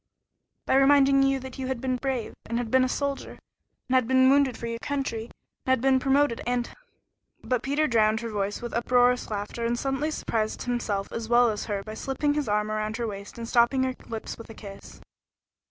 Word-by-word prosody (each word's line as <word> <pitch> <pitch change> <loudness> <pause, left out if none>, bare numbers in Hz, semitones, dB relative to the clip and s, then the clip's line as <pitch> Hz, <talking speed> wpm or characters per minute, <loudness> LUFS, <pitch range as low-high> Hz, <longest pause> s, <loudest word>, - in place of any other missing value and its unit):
"By 265 - +3
reminding 275 0 +5
you 270 0 +2
that 260 +1 -9
you 260 - -3
had 260 -2 -2
been 255 0 -1
brave 260 -3 -3
and 230 - -2
had 240 -2 -3
been 260 0 +5
a 255 - +1
soldier 280 +1 -3 0.5
and 255 - -2
had 255 -3 +3
been 260 +1 +5
wounded 275 -3 +3
for - - -6
your 230 0 -4
country 265 -5 -3
and - - -17 0.3
had 260 -1 +3
been 265 +1 +3
promoted 270 -2 +2
and 245 -1 -1 0.4
" - - -45
But 250 -2 0
Peter 285 +4 +1
drowned 220 -4 +2
her 230 - -4
voice 205 +1 -2
with 240 - -5
uproarious 245 +1 +2
laughter, 210 +2 -4
and 235 +1 0
suddenly 270 +4 -1
surprised 220 -7 -2
himself 220 -5 -2
as 230 -1 -5
well 240 -1 +5
as 210 - -4
her 200 -2 -3
by 215 - -7
slipping 270 +5 -1
his 290 -6 -2
arm 210 +1 0
around 215 +1 -2
her 235 - -2
waist 200 -1 -7
and 230 -1 -5
stopping 240 +3 +3
her 260 0 0 0.2
lips 225 0 -6
with 230 - -11
a 225 - -10
kiss. 200 -2 -11
245 Hz, 215 wpm, -26 LUFS, 225-270 Hz, 0.5 s, reminding